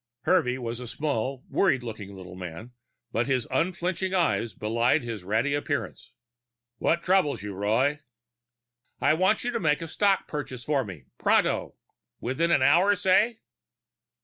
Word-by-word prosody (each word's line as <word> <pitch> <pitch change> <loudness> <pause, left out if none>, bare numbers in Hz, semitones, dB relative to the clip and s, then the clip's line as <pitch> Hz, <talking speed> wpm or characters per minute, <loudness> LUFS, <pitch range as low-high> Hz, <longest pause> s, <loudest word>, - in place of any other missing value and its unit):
Hervey 155 -9 +2
was 120 -2 -5
a 125 - -7
small, 135 -1 -2
worried 135 -10 +2
looking 105 -4 -7
little 95 -1 -10
man, 90 +6 -8 0.4
but 115 +3 0
his 130 -4 +1
unflickering 180 +5 -1
eyes 165 -10 +1
belied 115 +4 +1
his 115 -5 -5
ratty 110 +9 0
appearance. 145 - -3 0.7
"What 170 +1 +1
troubles 180 - +2
you, 105 -1 -5
Roy?" 115 +10 +1 1.0
"I - - +4
want 185 +6 +2
you 245 - -1
to 230 - -1
make 150 -5 +2
a - - -5
stock 200 +3 +1
purchase 130 -4 -5
for 140 0 +1
me, 95 - -9 0.2
pronto. - - +2 0.4
Within 135 +8 0
an 140 -6 +4
hour, 175 +9 +5
say?" 210 +5 +2
135 Hz, 150 wpm, -27 LUFS, 115-170 Hz, 1.0 s, hour